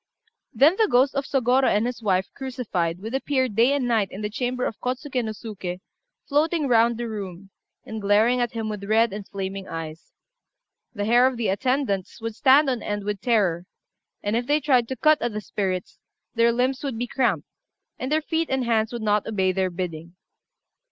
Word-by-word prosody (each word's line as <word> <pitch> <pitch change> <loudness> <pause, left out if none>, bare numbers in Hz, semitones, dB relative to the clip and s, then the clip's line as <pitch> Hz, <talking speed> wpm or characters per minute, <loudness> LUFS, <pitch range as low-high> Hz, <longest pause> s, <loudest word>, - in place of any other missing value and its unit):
Then 310 +8 +4
the 440 - +4
ghost 260 +3 +4
of 275 -1 -1
Sôgorô 260 -1 +2
and 210 +2 +2
his 245 -1 -4
wife 190 -3 +1
crucified 205 -11 -3
would 225 +3 -5
appear 265 -1 +1
day 230 +3 +3
and 275 -3 0
night 225 -4 +2
in 195 - -8
the 210 0 -3
chamber 250 +2 -2
of 220 - -4
Kôtsuké 255 0 -2
no 220 - -3
Suké, 200 -5 -6 0.5
floating 305 +1 +1
round 235 -1 +3
the 240 0 -3
room, 195 -3 -7 0.3
and 220 -1 -6
glaring 215 +5 +3
at 240 -1 -1
him 225 -1 -3
with 210 -2 -5
red 220 +1 +3
and 205 -1 -7
flaming 195 0 -5
eyes. 160 0 -7 0.8
The 205 - -2
hair 240 +3 +5
of 260 -2 -2
the 230 -4 0
attendants 225 -2 -1
would 225 0 -4
stand 275 +5 +5
on 250 -3 -1
end 205 -1 -3
with 205 -1 -3
terror; 185 -7 +1 0.6
and 205 +2 0
if 240 +1 -1
they 295 +1 +3
tried 260 -5 +2
to 260 - -4
cut 310 +2 +3
at 240 -2 -1
the 210 - -2
spirits, 190 -3 -3 0.3
their 235 0 +4
limbs 255 +3 0
would 270 -5 -3
be 245 - -1
cramped, 235 - 0 0.5
and 260 +2 -4
their 310 0 +2
feet 325 +1 -1
and 265 -1 0
hands 225 -1 +1
would 240 -2 -5
not 210 -1 +1
obey 190 -4 +1
their 190 0 0
bidding. 170 -1 -6
230 Hz, 200 wpm, -24 LUFS, 200-255 Hz, 0.8 s, hair